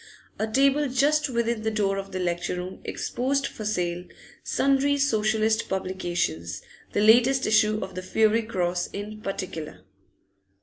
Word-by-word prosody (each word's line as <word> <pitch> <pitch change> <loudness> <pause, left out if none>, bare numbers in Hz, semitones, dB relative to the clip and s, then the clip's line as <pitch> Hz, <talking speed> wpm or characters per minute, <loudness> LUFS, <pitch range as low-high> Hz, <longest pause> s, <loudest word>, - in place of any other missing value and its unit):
A 220 - 0
table 275 +5 +3
just 285 +3 +2
within 235 -2 -1
the 220 - 0
door 200 -2 0
of 195 0 -7
the 185 - -4
lecture 175 -1 -1
room 180 +1 -6
exposed 275 +3 -1
for 215 - -6
sale 180 -4 -1 0.4
sundry 275 +1 +2
Socialist 220 -4 +1
publications, 175 - -2 0.3
the 205 - 0
latest 245 +5 +5
issue 215 0 +3
of 190 - -7
the 185 - -5
'Fiery 220 +4 +2
Cross' 180 -5 -1
in 210 +1 -7
particular. 165 - -5
215 Hz, 140 wpm, -26 LUFS, 185-245 Hz, 0.4 s, latest